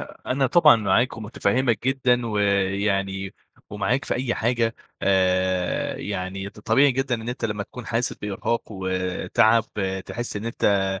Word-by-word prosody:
آآ -, -, -11 dB
أنا 135 Hz, +1 st, +1 dB
طبعًا 150 Hz, -2 st, +6 dB
معاك 115 Hz, +3 st, +1 dB
ومُتفهّمك 115 Hz, +2 st, 0 dB
جدًا، 125 Hz, -3 st, +1 dB
ويعني 100 Hz, -1 st, 0 dB, 0.4 s
ومعاك 105 Hz, +7 st, -1 dB
في -, -, -1 dB
أي 125 Hz, -1 st, -1 dB
حاجة، 115 Hz, -1 st, 0 dB, 0.3 s
آآ 95 Hz, -1 st, +1 dB
يعني 95 Hz, 0 st, -4 dB
ط 105 Hz, -, -15 dB
طبيعي 130 Hz, +6 st, +4 dB
جدًا 135 Hz, 0 st, 0 dB
إن 115 Hz, 0 st, -6 dB
أنت 125 Hz, -1 st, -4 dB
لما 105 Hz, -2 st, -2 dB
تكون 125 Hz, +3 st, -10 dB
حاسِسّ 120 Hz, +2 st, 0 dB
بإرهاق 105 Hz, +2 st, -3 dB
و 95 Hz, -1 st, -4 dB, 0.5 s
تعب، 110 Hz, +1 st, +5 dB, 0.4 s
تحِسّ 120 Hz, -2 st, -4 dB
إن 105 Hz, -, -5 dB
أنت 95 Hz, -4 st, +1 dB
110 Hz, 145 wpm, -24 LUFS, 95-120 Hz, 0.5 s, طبعًا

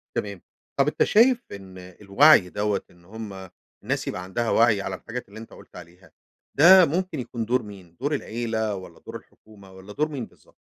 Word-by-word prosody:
تمام، 100 Hz, -3 st, -4 dB, 0.4 s
طب 140 Hz, -, +3 dB
أنتَ -, -, +1 dB
شايف 240 Hz, +3 st, +4 dB
إن 95 Hz, -2 st, -11 dB
الوعي 95 Hz, -, +3 dB
ده 105 Hz, 0 st, -2 dB
إن 85 Hz, 0 st, -23 dB
هُم 100 Hz, -3 st, -9 dB, 0.3 s
الناس -, -, -3 dB
يبقى 90 Hz, -, -4 dB
عندها 110 Hz, +5 st, -3 dB
وعي 110 Hz, -3 st, +3 dB
على 95 Hz, -1 st, -4 dB
الحاجات 120 Hz, +6 st, -8 dB
اللي -, -, -11 dB
أنت 115 Hz, -, -12 dB
قُلت -, -, -17 dB
عليها، 90 Hz, +1 st, -14 dB, 0.5 s
ده 180 Hz, +4 st, +8 dB
ممكن 170 Hz, -1 st, -3 dB
يكون 115 Hz, -2 st, -5 dB
دور 125 Hz, +1 st, 0 dB
مين؟ 95 Hz, -5 st, -13 dB
دور 145 Hz, +2 st, 0 dB
العائلة 110 Hz, -4 st, -3 dB
والّا 95 Hz, -1 st, -11 dB
دور -, -, -11 dB
الحكومة 100 Hz, -3 st, -19 dB
والّا 95 Hz, +2 st, -13 dB
دور 150 Hz, +1 st, 0 dB
مين 135 Hz, -6 st, -5 dB
بالضبط؟ -, -, -25 dB
105 Hz, 185 wpm, -24 LUFS, 95-125 Hz, 0.5 s, ده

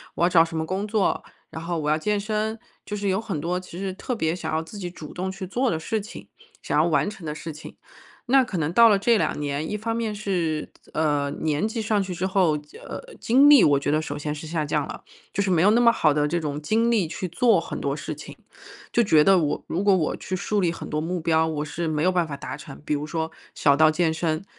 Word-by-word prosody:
我 -, -, -1 dB
要 175 Hz, -, +5 dB
找 165 Hz, -2 st, +6 dB
什 165 Hz, -, -8 dB
么 160 Hz, -, -1 dB
工 195 Hz, +4 st, -2 dB
作， 210 Hz, -2 st, +1 dB, 0.3 s
然 160 Hz, -, -7 dB
后 170 Hz, +1 st, -3 dB
我 150 Hz, -1 st, -1 dB
要 155 Hz, -, +3 dB
健 210 Hz, +5 st, 0 dB
身， 215 Hz, +1 st, -2 dB, 0.3 s
就 210 Hz, -, -4 dB
是 200 Hz, 0 st, -2 dB
有 190 Hz, -, +1 dB
很 200 Hz, -8 st, -4 dB
多 180 Hz, +3 st, -1 dB
其 180 Hz, -2 st, -11 dB
实 195 Hz, 0 st, -2 dB
特 245 Hz, +5 st, -4 dB
别 160 Hz, -6 st, 0 dB
想 180 Hz, -, -4 dB
要 160 Hz, -, +1 dB
自 165 Hz, +6 st, -11 dB
己 180 Hz, -3 st, -4 dB
主 160 Hz, -4 st, -10 dB
动 190 Hz, +1 st, -3 dB
去 190 Hz, 0 st, -6 dB
做 250 Hz, +7 st, 0 dB
的 160 Hz, -, -1 dB
事 220 Hz, +7 st, -2 dB
情， 215 Hz, -, -10 dB, 0.3 s
想 -, -, -1 dB
要 155 Hz, -, +4 dB
完 155 Hz, +1 st, +2 dB
成 195 Hz, -5 st, -10 dB
的 150 Hz, -, -3 dB
事 165 Hz, +1 st, -6 dB
情。 155 Hz, -, -11 dB, 0.6 s
那 270 Hz, -1 st, +6 dB
可 195 Hz, -8 st, -3 dB
能 155 Hz, +1 st, -1 dB
到 230 Hz, +4 st, +7 dB
了 200 Hz, -2 st, +4 dB
这 230 Hz, +2 st, +3 dB
两 -, -, -1 dB
年， 145 Hz, +4 st, -3 dB
一 -, -, -1 dB
方 225 Hz, +2 st, -2 dB
面 230 Hz, -2 st, -2 dB
是， 175 Hz, -7 st, -2 dB, 0.2 s
呃， 145 Hz, -2 st, +1 dB
年 155 Hz, +5 st, 0 dB
纪 225 Hz, 0 st, -3 dB
上 210 Hz, -1 st, +1 dB
去 190 Hz, -1 st, -5 dB
之 180 Hz, +2 st, -2 dB
后， 190 Hz, -4 st, +3 dB, 0.4 s
呃， -, -, -8 dB
精 270 Hz, +5 st, +5 dB
力 290 Hz, -3 st, +8 dB
我 145 Hz, -1 st, +4 dB
觉 140 Hz, -, -2 dB
得 155 Hz, +1 st, +2 dB
首 145 Hz, -1 st, -5 dB
先 150 Hz, 0 st, -3 dB
是 150 Hz, -, -8 dB
下 160 Hz, 0 st, -2 dB
降 150 Hz, 0 st, -1 dB
了， -, -, -8 dB, 0.3 s
就 200 Hz, -, 0 dB
是 195 Hz, -, 0 dB
没 170 Hz, -2 st, +3 dB
有 205 Hz, -, +6 dB
那 235 Hz, +2 st, +4 dB
么 235 Hz, -, +6 dB
好 150 Hz, -, +2 dB
的 150 Hz, 0 st, +1 dB
这 170 Hz, +3 st, 0 dB
种 150 Hz, -2 st, -4 dB
精 225 Hz, +9 st, +2 dB
力， 210 Hz, -7 st, +2 dB
去 180 Hz, +3 st, -4 dB
做 200 Hz, +2 st, +3 dB
很 -, -, -6 dB
多 140 Hz, 0 st, -1 dB
事 155 Hz, -, -5 dB
情。 150 Hz, -, -11 dB, 0.6 s
就 235 Hz, -, +4 dB
觉 160 Hz, -9 st, +5 dB
得 190 Hz, +2 st, +5 dB
我 150 Hz, -3 st, -1 dB
如 180 Hz, +4 st, -2 dB
果 200 Hz, -1 st, +5 dB
我 155 Hz, -4 st, 0 dB
去 185 Hz, -, -4 dB
树 205 Hz, +3 st, -1 dB
立 170 Hz, -2 st, +2 dB
很 -, -, -7 dB
多 150 Hz, 0 st, -2 dB
目 175 Hz, +3 st, -2 dB
标， 160 Hz, 0 st, +2 dB
我 150 Hz, -2 st, -2 dB
是 165 Hz, +2 st, -3 dB
没 155 Hz, -1 st, 0 dB
有 185 Hz, -, +4 dB
办 175 Hz, -2 st, +1 dB
法 140 Hz, -2 st, -6 dB
达 -, -, -6 dB
成， 70 Hz, -, -11 dB
比 -, -, 0 dB
如 145 Hz, +1 st, -2 dB
说 160 Hz, 0 st, -3 dB, 0.2 s
小 140 Hz, -, +4 dB
到 155 Hz, +2 st, +5 dB
健 160 Hz, 0 st, +1 dB
身， 160 Hz, +1 st, -2 dB
175 Hz, 290 characters per minute, -24 LUFS, 155-205 Hz, 0.6 s, 力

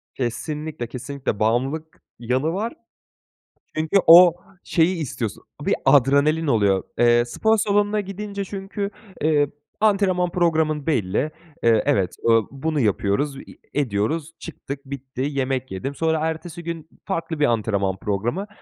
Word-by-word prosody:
Kesinlikle, 150 Hz, +2 st, -4 dB
kesinlikle 130 Hz, -2 st, -4 dB
bağımlılık 135 Hz, +9 st, -1 dB, 0.2 s
yanı 130 Hz, +7 st, 0 dB
var. 215 Hz, -, -2 dB, 1.0 s
Çünkü 155 Hz, +5 st, +2 dB
o 170 Hz, +1 st, +10 dB, 0.3 s
şeyi 170 Hz, +2 st, +2 dB
istiyorsun, 125 Hz, -8 st, -4 dB, 0.2 s
bir -, -, +1 dB
adrenalin 140 Hz, +4 st, +4 dB
oluyor. 100 Hz, -7 st, +2 dB
Eee, 120 Hz, 0 st, +4 dB
spor 220 Hz, -, +1 dB
salonuna 205 Hz, 0 st, +2 dB
gidince 200 Hz, +1 st, -5 dB
çünkü, 200 Hz, +1 st, -4 dB, 0.3 s
eee, 145 Hz, -2 st, +3 dB, 0.3 s
antrenman 195 Hz, -4 st, +2 dB
programın 160 Hz, -4 st, +1 dB
belli, 105 Hz, -10 st, 0 dB, 0.5 s
eee, 115 Hz, -2 st, +4 dB
evet, 95 Hz, -3 st, +1 dB
eee, 115 Hz, 0 st, +6 dB
bunu 150 Hz, +3 st, -2 dB
yapıyoruz, 115 Hz, +5 st, 0 dB
i -, -, -13 dB
ediyoruz, 140 Hz, +5 st, -1 dB
çıktık, 140 Hz, 0 st, -8 dB
bitti, 135 Hz, -1 st, -7 dB
yemek 135 Hz, -2 st, -1 dB
yedim. 135 Hz, +9 st, -4 dB
Sonra 160 Hz, 0 st, +1 dB
ertesi 160 Hz, +2 st, -4 dB
gün 165 Hz, -1 st, -6 dB, 0.2 s
farklı 165 Hz, -4 st, -3 dB
bir 150 Hz, -, +4 dB
antrenman 100 Hz, -6 st, 0 dB
programı. 110 Hz, -, -2 dB
145 Hz, 125 wpm, -23 LUFS, 120-170 Hz, 1.0 s, o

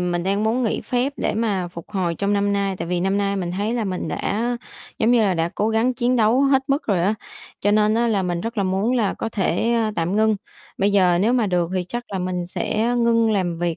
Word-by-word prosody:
mình 175 Hz, -1 st, -1 dB
đang 195 Hz, +3 st, 0 dB
muốn 230 Hz, +4 st, +1 dB
nghỉ 225 Hz, -, 0 dB
phép 250 Hz, +3 st, -1 dB
để -, -, -1 dB
mà 200 Hz, -5 st, -1 dB
phục 170 Hz, -1 st, -11 dB
hồi 185 Hz, -4 st, -1 dB
trong 200 Hz, +3 st, -1 dB
năm 200 Hz, 0 st, +1 dB
nay. 200 Hz, -1 st, 0 dB
Tại 170 Hz, -, -5 dB
vì 180 Hz, -1 st, 0 dB
năm 195 Hz, +2 st, +1 dB
nay 200 Hz, 0 st, 0 dB
mình 175 Hz, -2 st, -3 dB
thấy 205 Hz, +5 st, -1 dB
là 230 Hz, -, -1 dB
mình 185 Hz, -4 st, -3 dB
đã, 235 Hz, +9 st, -1 dB, 0.4 s
giống 225 Hz, +2 st, +3 dB
như 240 Hz, -2 st, +4 dB
là, 195 Hz, -3 st, +2 dB
đã 165 Hz, 0 st, 0 dB
cố 210 Hz, -, 0 dB
gắng 225 Hz, +3 st, +1 dB
chiến 250 Hz, 0 st, +1 dB
đấu 230 Hz, +3 st, +3 dB
hết 275 Hz, -1 st, +3 dB
mức 275 Hz, +2 st, 0 dB
rồi 200 Hz, -5 st, +2 dB
á, 200 Hz, +4 st, +2 dB, 0.5 s
cho 205 Hz, -, +2 dB
nên 210 Hz, +1 st, +3 dB
á 235 Hz, +1 st, +2 dB
là 205 Hz, -4 st, +1 dB
mình 175 Hz, -2 st, -2 dB
rất 230 Hz, +2 st, -4 dB
là 200 Hz, -, +1 dB
muốn 195 Hz, +6 st, 0 dB
là 215 Hz, -5 st, +1 dB
có 225 Hz, -, -4 dB
thể, 210 Hz, +2 st, 0 dB
ơ, 225 Hz, -2 st, +1 dB
tạm 170 Hz, +4 st, 0 dB
ngưng. 220 Hz, 0 st, +3 dB, 0.4 s
Bây 200 Hz, +1 st, +2 dB
giờ 180 Hz, -3 st, +4 dB
nếu 220 Hz, +5 st, +2 dB
mà 245 Hz, -4 st, +2 dB
được 175 Hz, -3 st, 0 dB
thì 185 Hz, -, 0 dB
chắc 240 Hz, +7 st, -5 dB
là 195 Hz, -, -2 dB
mình 180 Hz, -1 st, -2 dB
sẽ 220 Hz, +6 st, -1 dB
ngưng 230 Hz, -1 st, +3 dB
làm 180 Hz, -5 st, -1 dB
việc 170 Hz, -1 st, -1 dB
205 Hz, 260 wpm, -22 LUFS, 185-230 Hz, 0.5 s, như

